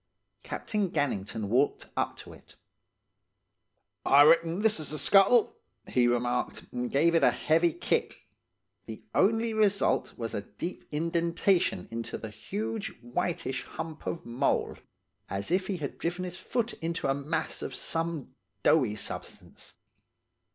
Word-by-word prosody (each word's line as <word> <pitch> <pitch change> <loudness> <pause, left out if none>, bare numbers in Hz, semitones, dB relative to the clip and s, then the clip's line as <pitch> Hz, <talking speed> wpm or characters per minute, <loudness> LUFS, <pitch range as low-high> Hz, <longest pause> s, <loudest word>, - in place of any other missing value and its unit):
Captain 210 -3 -2
Gannington 110 - -1
walked 125 +8 +1
up - - -1
to - - -10
it. - - -18 1.5
"'I 140 +1 +7
reck'n 165 +4 +4
this's 210 -9 +2
the 155 - -3
scuttle,' 195 - +5 0.3
he 125 -1 +3
remarked, 120 +1 -1
and 125 0 -3
gave 165 +5 +3
it 165 - +3
a - - +7
heavy 165 +2 +2
kick. - - -1 0.7
The 110 - -8
only 225 +3 +2
result 205 -2 +2
was 115 -2 -4
a 100 - -2
deep 105 - -7
indentation 170 +4 +1
into 115 0 -4
the 110 - -7
huge, 215 - -4 0.2
whiteish 135 +1 -2
hump 160 -1 -7
of 170 0 -3
mould, 125 +4 0 0.5
as 100 +9 -3
if 185 +1 +2
he 195 - -2
had 145 -4 -5
driven 175 +2 -2
his 180 0 -5
foot 240 +2 -2
into 165 -2 -2
a 135 - +3
mass 150 +3 -2
of - - -5
some 165 -5 -3 0.3
doughy 125 -10 +4
substance. 105 - -7
165 Hz, 135 wpm, -29 LUFS, 125-185 Hz, 1.5 s, I